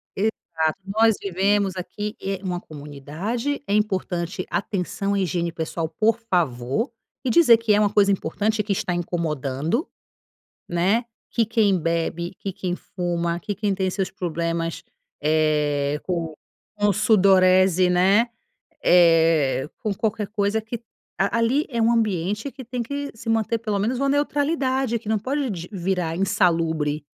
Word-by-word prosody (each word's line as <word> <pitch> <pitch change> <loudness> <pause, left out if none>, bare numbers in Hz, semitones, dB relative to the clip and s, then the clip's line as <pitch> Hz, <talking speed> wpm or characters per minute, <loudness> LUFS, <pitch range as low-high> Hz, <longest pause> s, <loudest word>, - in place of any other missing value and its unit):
Exato, 165 -6 -1
nós 220 +2 +3
vivemos 195 +1 +1
aqui 210 +3 -5
em 195 -1 -3
uma 180 -1 -2
comunidade, 155 - -4
é 200 - 0
importante 185 -3 -1
atenção 195 0 -2
à 200 - +1
higiene 170 -2 -1
pessoal, 160 0 -3
por 220 +7 +1
favor, 175 - -1 0.3
e - - +1
dizer 240 -5 +7
que 225 -2 +2
é 205 - +4
uma 205 -1 +3
coisa 200 -1 +4
importante 205 +4 0
que 205 - -3
está 180 -2 0
incomodando, 165 - -2 0.8
né. 190 +8 +2 0.2
Que 230 -2 +1
quem 210 -4 +2
bebe, 170 +1 -1
que 195 -2 -4
quem 185 -2 -3
fuma, 170 -2 -2
que 210 +1 -4
quem 200 0 -1
tem 190 -1 0
seus 190 0 -2
problemas, 170 -2 -3 0.4
eh, 150 -2 +1
com 170 -3 -2 0.5
com 205 -1 +3
sudorese, 185 -3 +4
né, 195 +6 +4 0.5
eh, 165 -5 +4
com 215 -3 -2
qualquer 210 0 -2
coisa 210 +1 0
que 220 +2 -6 0.4
ali 230 +8 +2
é 235 -2 -2
um 230 +1 +4
ambiente 210 - 0
que 260 -3 -10
tem 245 0 -3
que 285 +4 -4
se 225 +1 -7
manter 225 0 +1
pelo 215 -3 -2
menos 235 +5 0
uma 275 0 +1
neutralidade, 280 -4 +1
que 215 - -14
não 220 -1 +2
pode 270 +3 -1
d 175 -2 -6
virar 180 -3 -1
insalubre 160 -6 +1
195 Hz, 145 wpm, -23 LUFS, 170-220 Hz, 0.8 s, dizer